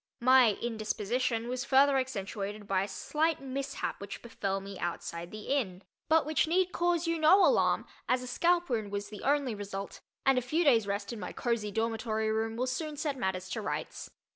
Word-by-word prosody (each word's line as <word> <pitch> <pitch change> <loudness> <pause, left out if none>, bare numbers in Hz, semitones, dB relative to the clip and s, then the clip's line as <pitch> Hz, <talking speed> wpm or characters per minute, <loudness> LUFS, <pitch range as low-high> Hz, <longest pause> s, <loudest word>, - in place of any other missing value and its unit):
My 255 -3 +6
indisposition 225 +1 -1
was 250 +1 -2
further 275 +1 +5
accentuated 205 -4 -4
by 190 -2 +2
a 195 - -2
slight 310 +10 0
mishap 270 -4 -4
which 200 0 -7
befell 195 -4 -2
me 195 -1 -9
outside 170 0 -4
the 215 +1 -8
Inn 205 -10 -1 0.3
but 320 0 +4
which 310 0 +1
need 365 +2 +2
cause 345 -1 +1
you 335 0 0
no 345 +6 +7
alarm - - +3 0.2
as 250 0 +2
a - - -6
scalp 345 +7 +2
wound 220 -5 -2
was 205 0 -3
the 210 - -9
only 280 -3 +1
result 200 -1 -6 0.3
and 270 -2 +5
a - - -4
few 305 +8 0
days' 230 -9 +4
rest 200 +2 -2
in 230 - -7
my - - -5
cozy 235 -3 -1
dormitory 220 0 -1
room 225 +1 -1
will 250 +2 0
soon 295 +4 -3
set 295 -1 -1
matters 190 -6 -2
to 225 - -3
rights. - - -4
235 Hz, 190 wpm, -30 LUFS, 205-280 Hz, 0.3 s, no